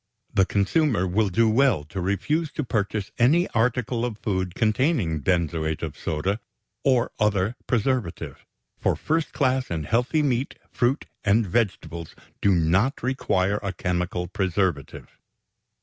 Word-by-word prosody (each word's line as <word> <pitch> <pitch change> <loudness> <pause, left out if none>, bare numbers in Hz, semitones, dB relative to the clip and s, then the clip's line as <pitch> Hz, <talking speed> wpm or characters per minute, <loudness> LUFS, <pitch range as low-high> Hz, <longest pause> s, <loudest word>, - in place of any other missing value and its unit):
The 95 -1 +3
consumer 105 - +2
will 100 +3 +1
do 115 +5 +3
well 110 - +3
to 90 +6 -6
refuse 145 - 0
to 150 - -2
purchase 105 -3 -2
any 155 +9 +4
article 120 +1 0
or 120 -3 -2
food 95 -4 -2
containing 110 - +1
benzoate 80 -2 0
of 80 -3 -4
soda 90 +7 -2 0.4
or 130 -4 +2
other 105 +1 +1
preservative, 120 -6 -1 0.4
for - - +1
first 160 0 -1
class 130 -2 +1
and 80 -3 -3
healthy 125 - +1
meat, 130 -1 0 0.2
fruit, 125 +4 0 0.2
and 105 +2 +3
vegetables 90 -5 -2 0.3
do 100 -2 +4
not 90 - +1
require 105 -6 +1
a 100 -2 -3
chemical 90 0 -2
preservative. 95 -5 -2
105 Hz, 135 wpm, -25 LUFS, 90-125 Hz, 0.4 s, any